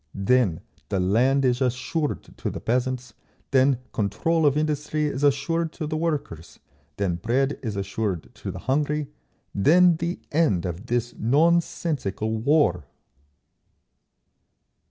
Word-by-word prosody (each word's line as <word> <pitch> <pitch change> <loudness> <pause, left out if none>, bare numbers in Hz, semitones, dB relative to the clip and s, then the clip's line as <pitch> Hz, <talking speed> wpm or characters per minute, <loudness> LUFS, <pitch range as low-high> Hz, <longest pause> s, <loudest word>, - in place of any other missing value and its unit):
Then 100 -3 +2 0.3
the 100 - 0
land 125 +9 +2
is 125 +1 +1
assured 130 +5 -1
to - - -3
the - - -6
peasants, 125 0 -1 0.4
then 135 -1 +4 0.2
control 160 - +1
of 145 0 +2
industry 150 0 -1
is 145 -1 -2
assured 155 +4 +1
to 160 - -5
the 155 +1 -3
workers, 150 - -3 0.4
then 95 -4 0
bread 130 +9 0
is 110 -5 -4
assured 100 -2 -3
to - - -7
the - - -6
hungry, 150 +2 0 0.4
then 170 - +5
the 170 +2 -3
end 145 - +2
of 90 +6 -5
this 120 0 -1
nonsensical 140 - +1
war! 120 - +2
130 Hz, 125 wpm, -24 LUFS, 110-150 Hz, 0.4 s, then